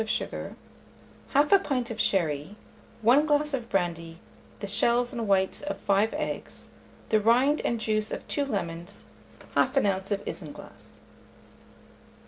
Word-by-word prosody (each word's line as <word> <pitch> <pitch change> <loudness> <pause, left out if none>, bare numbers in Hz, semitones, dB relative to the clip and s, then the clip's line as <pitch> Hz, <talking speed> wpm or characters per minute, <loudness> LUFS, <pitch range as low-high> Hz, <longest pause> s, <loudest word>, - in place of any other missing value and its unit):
of 220 - -4
sugar, 230 - -3 0.8
1/2 295 +8 +5
pint 250 -4 -1
of 220 -1 -1
sherry, 160 -1 0 0.5
1 270 +7 +5
glass 295 0 +2
of 240 -3 -3
brandy, 170 -3 -2 0.4
the - - -4
shells 235 +5 +2
and 230 -3 -3
whites 190 -1 +2
of 295 0 -4
5 205 +2 +2
eggs, - - -5 0.4
the 215 -1 +3
rind 250 +7 +4
and 235 - 0
juice 215 -1 0
of - - -5
2 285 - 0
lemons, 195 -6 -4 0.5
1/2 265 0 +3
oz. 195 0 -1
of 200 0 -1
isinglass. - - -9
220 Hz, 135 wpm, -27 LUFS, 195-260 Hz, 0.8 s, 1/2